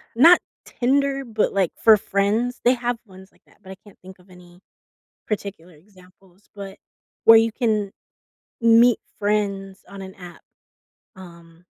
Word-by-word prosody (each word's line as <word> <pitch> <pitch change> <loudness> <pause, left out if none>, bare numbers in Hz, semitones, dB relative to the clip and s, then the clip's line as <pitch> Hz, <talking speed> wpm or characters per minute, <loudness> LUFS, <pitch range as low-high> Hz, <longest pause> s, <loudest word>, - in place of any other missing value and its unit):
not 335 +9 +6 0.3
Tinder, 275 +2 -1
but, 220 -3 -2
like, 195 -3 0
for 220 -1 +6
friends. 210 +5 -2
They 245 - +5
have 245 -1 -3
ones 190 -1 -16
like - - -32
that- - - -26
but 190 - -12
I - - -9
can't 205 - -18
think 190 0 -15
of 180 +1 -24
any 180 -1 -18 0.7
particular 195 -5 -6
examples- 185 +2 -24
but 195 -1 -10 0.5
where 225 0 +8
you 225 0 +2
can 215 -3 -2 0.7
meet 230 +1 +4 0.2
friends 200 -2 -3
on 200 0 -10
an 190 0 -11
app, 175 -2 -13 0.7
um 170 -2 -16
200 Hz, 150 wpm, -21 LUFS, 185-225 Hz, 0.7 s, where